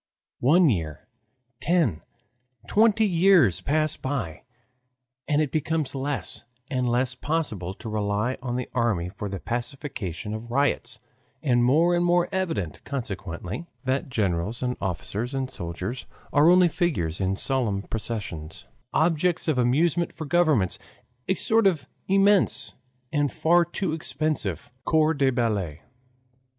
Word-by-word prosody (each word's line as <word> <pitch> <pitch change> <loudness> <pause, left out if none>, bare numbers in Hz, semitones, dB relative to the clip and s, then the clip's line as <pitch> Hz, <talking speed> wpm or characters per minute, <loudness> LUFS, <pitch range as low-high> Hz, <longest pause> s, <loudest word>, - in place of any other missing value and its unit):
One 165 +7 +5
year, 80 - -2 0.5
ten, 160 - +1 0.6
twenty 220 - +4
years 180 - +4
pass 155 +1 +1
by. 130 - -4 0.8
And 150 +1 +3
it 145 - -4
becomes 155 -1 -1
less 135 0 -3 0.3
and 125 -2 0
less 125 +2 +1
possible 125 - -2
to 110 - -9
rely 105 +3 -1
on 125 -1 -3
the 125 -1 -2
army 110 -8 0
for 100 +2 -6
the 95 -1 -4
pacification 120 - -4
of 110 +2 -6
riots, 130 -1 0 0.5
and 120 -4 +3
more 160 +8 +4
and 175 - +2
more 175 0 +3
evident, 165 - -2
consequently, 105 - -5 0.2
that 130 +1 -1
generals, 105 0 -1
and 125 0 0
officers, 100 - -3
and 130 -1 -2
soldiers 90 +8 -5 0.3
are 150 +3 +6
only 180 0 +6
figures 100 - -1
in 95 0 +1
solemn 110 -4 -1
processions 100 - -5 0.3
objects 165 +2 +2
of 150 -5 +2
amusement 155 +8 +2
for 160 - -6
governments 150 - +2 0.5
a 190 - +2
sort 220 +2 +3
of 160 -8 0 0.2
immense 195 0 +3 0.4
and 145 -2 +1
far 175 +2 +4
too 175 0 -3
expensive 145 - -2
CORPS 155 0 +2
DE 135 -1 +4
BALLET. 105 - -1
130 Hz, 130 wpm, -25 LUFS, 105-160 Hz, 0.8 s, are